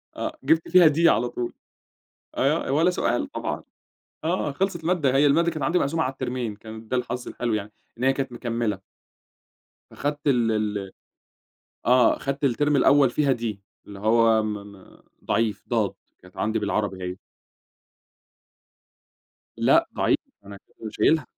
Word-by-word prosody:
آه، 315 0 -4
جِبت 160 0 +2
فيها 180 -2 +7
D 160 +3 +1
على 125 -6 +3
طول 120 0 -4 0.8
أيوَه 145 +5 +1
آآ - - -4
ولا 160 +6 +3
سؤال 180 - -1
طبعًا - - -4 0.6
آه 160 -2 0
خلصت 180 +3 -2
المادة، 160 -6 +1
هي 140 +2 +5
المادة 165 +4 +3
كانت 155 -3 -4
عندي 170 +6 +2
مقسومة 160 +3 0
على 130 - -1
الترمين 125 -4 -4
كان 110 +1 -11
ده 125 - 0
الحظ 125 0 -4
الحلو 120 -2 -2
يعني 105 0 -3 0.3
إن 120 - -5
هي 135 +1 +4
كانت 135 -1 -3
مكملة. 115 -4 -2 1.1
أخدت 145 +1 -3
ال 120 -5 +3
ال 105 -3 -2 1.0
آه، 125 -1 +5
أخدت 140 +1 -3
الترم 145 +3 +2
الأوّل 140 -1 +5
فيها 140 +2 +2
D 120 -1 -7 0.4
اللي 100 -1 -10
هو 110 +1 +3
م-م 100 -2 -8 0.2
ضعيف 110 -3 0
ضاد، - - +1 0.3
كانت 90 0 -19
عندي 110 +1 0
بالعربي 100 -2 -2
هي. 90 0 -4 2.4
لأ - - +4
ضعيف، - - +2 0.3
أنا 100 0 -10
كنت 110 +2 -11
شايلها. 160 0 +2
125 Hz, 150 wpm, -24 LUFS, 110-145 Hz, 2.4 s, فيها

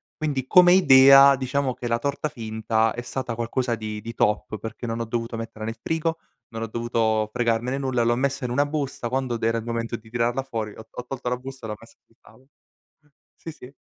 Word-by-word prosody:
quindi 140 -4 -2
come 180 +4 +6
idea, 135 -4 +8
diciamo 130 0 -1
che 120 - -6
la 115 0 +1
torta 140 +4 -2
finta 110 -1 -1
è 120 - -5
stata 125 -1 -4
qualcosa 120 +1 -2
di 110 -1 -5
di 115 +2 -7
top, 105 -1 0
perché 115 +2 -7
non 115 0 -3
ho 115 - -2
dovuto 115 +1 -3
metterla 115 -1 -6
nel 115 +1 -5
frigo, 160 0 -1 0.3
non 115 -1 -7
ho 115 - -2
dovuto 110 -1 0
fregarmene 120 +3 0
nulla, 130 -3 0
l'ho 120 +1 +2
messa 140 +1 -1
in 120 - -3
una 145 +3 +2
busta, 140 -5 -3
quando 130 -2 -1
d 115 - -11
era 115 +1 +2
il 115 - -5
momento 115 0 -3
di 110 -1 -12
tirarla 120 +2 0
fuori 110 -5 -5
ho 110 - -11
ho 125 - -8
tolto 125 -2 -4
la 125 - -1
busta 130 -2 -9
e - - -6
l'ho 105 - -3
messa - - -18
sul - - -32
tavolo. 130 +1 -21 0.5
Mh, 150 - -31 0.3
sì, 165 - -8
sì. 130 -2 -13
120 Hz, 225 wpm, -24 LUFS, 115-135 Hz, 0.5 s, idea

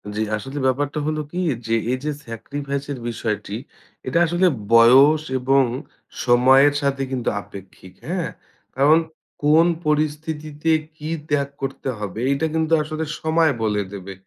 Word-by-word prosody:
জি, 110 - -1
আসলে 135 +6 -7
ব্যাপারটা 145 +3 -1
হল 155 0 -1
কি? 180 - -3 0.3
যে 115 - +2 0.2
এই 130 - 0
যে 150 - -1 0.2
স্যাক্রিফাইসের 140 +3 -5
বিষয়টি 105 -3 -3 0.5
এটা 170 - +2
আসলে 175 +3 +2 0.3
বয়স 135 +7 +7 0.2
এবং 135 +2 +3 0.6
সময়ের 130 +4 +5
সাথে 140 -1 0
কিন্তু 125 -3 -1
আপেক্ষিক, 95 -1 -13
হ্যাঁ? 175 0 -2 0.5
কারণ 145 +5 +5 0.4
কোন 155 +3 +5 0.2
পরিস্থিতিতে 150 0 -1 0.3
কী 155 0 -6 0.2
ত্যাগ 140 -1 +1
করতে 135 0 -4
হবে? 105 +1 -5
এইটা 140 +3 0
কিন্তু 160 0 0
আসলে 155 +1 -4 0.2
সময় 160 0 +3
বলে 105 -1 +1
দেবে 100 -1 -7
140 Hz, 135 wpm, -22 LUFS, 125-155 Hz, 0.6 s, বয়স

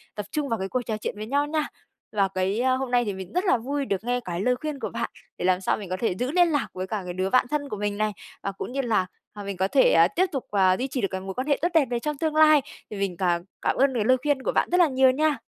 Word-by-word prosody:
tập 210 - -4
trung 295 -2 -2
vào 230 - -1
cái 190 0 -3
cuộc 255 - -1
trò 220 -2 -1
chuyện 210 - -4
với 215 - -5
nhau 285 +4 +1
nha. 310 0 -1 0.4
Và 200 -2 +2
cái, 190 +4 0
a, 260 0 +3
hôm 260 -1 -2
nay 245 -1 +3
thì 205 - -2
mình 190 -1 -8
rất 360 +3 0
là 310 - +4
vui 275 +4 -3
được 195 -4 -2
nghe 245 +1 0
cái 175 -5 -4
lời 250 +4 +2
khuyên 295 +2 -5
của - - -3
bạn, - - -3 0.3
để - - -3
làm 185 0 +2
sao - - +1
mình 200 -4 -8
có 185 - -2
thể 225 -6 0
giữ 250 +2 -1
liên 350 +1 +4
lạc 290 -3 0
với 185 0 -4
cả 210 0 -3
cái 180 - -5
đứa 185 +1 -1
bạn 255 - +4
thân 290 -1 -1
của 210 - -4
mình 205 0 -2
này, 215 0 +1 0.3
và 200 - -1
cũng 195 - -7
như 275 +2 -1
là, 225 -7 +1 0.3
à, 205 - -8
mình 200 -1 -5
có 190 +1 +1
thể, 265 +6 +4
à, 165 +1 +6
tiếp 360 - +1
tục, 270 -4 -3
à, 190 -2 +4
duy 260 - -2
trì 260 -1 -3
được 195 - +1
cái 190 -1 -3
mối 190 0 -6
quan 255 +7 -3
hệ 285 - +3
tốt 340 - +3
đẹp 320 -4 +5
này 240 -1 -1
trong 300 +3 -3
tương 310 +1 -1
lai, 310 -1 +6 0.3
thì 210 - -6
mình 195 -3 -2
càng 175 -2 +1 0.2
cảm - - +1
ơn 270 0 +3
cái 215 -3 +1
lời 255 +3 +5
khuyên 290 -2 +1
của - - 0
bạn - - +1
rất 360 - +3
là 350 - +6
nhiều 260 -2 +4
nha. 300 +2 +1
245 Hz, 325 wpm, -25 LUFS, 195-280 Hz, 0.4 s, à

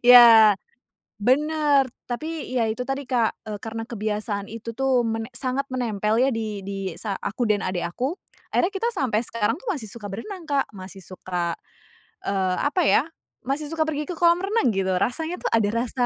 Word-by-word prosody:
Ya. 230 -4 +9 0.6
Bener, 290 +4 +3 0.2
tapi 310 +3 -4
ya 225 - +2
itu 220 +3 -2
tadi, 270 +1 -3
Kak, 240 -3 +1
eee, 210 -1 -4
karena 225 0 -5
kebiasaan 210 -2 -3
itu 230 0 -7
tuh 255 -2 +2
mene 225 +2 -3
sangat 255 +3 -2
menempel 220 -3 0
ya, 260 +2 +4
di 215 -2 -3
di 195 -1 -3
sa 205 -3 -3
aku 230 +3 -2
dan 210 -1 +2
adik 180 -2 -1
aku, 260 - -3 0.3
akhirnya 355 - +2
kita 455 +5 0
sampai 250 - 0
sekarang 230 -1 0
tuh 375 - -16
masih 270 - -3
suka 205 -1 -7
berenang, 360 - -6
Kak, 285 -3 +1
masih 190 +1 -9
suka, 180 -2 -3 0.7
eee, 190 -2 0
apa 300 +6 +1
ya, - - +5 0.4
masih 280 +4 -2
suka 320 +1 -3
pergi 300 -1 -2
ke 360 - -4
kolam 340 +1 +4
renang 410 - +2
gitu, 190 -1 0
rasanya 320 - -1
tuh - - -1
ada 220 -3 +3
rasa 245 +1 0
235 Hz, 180 wpm, -24 LUFS, 210-280 Hz, 0.7 s, Ya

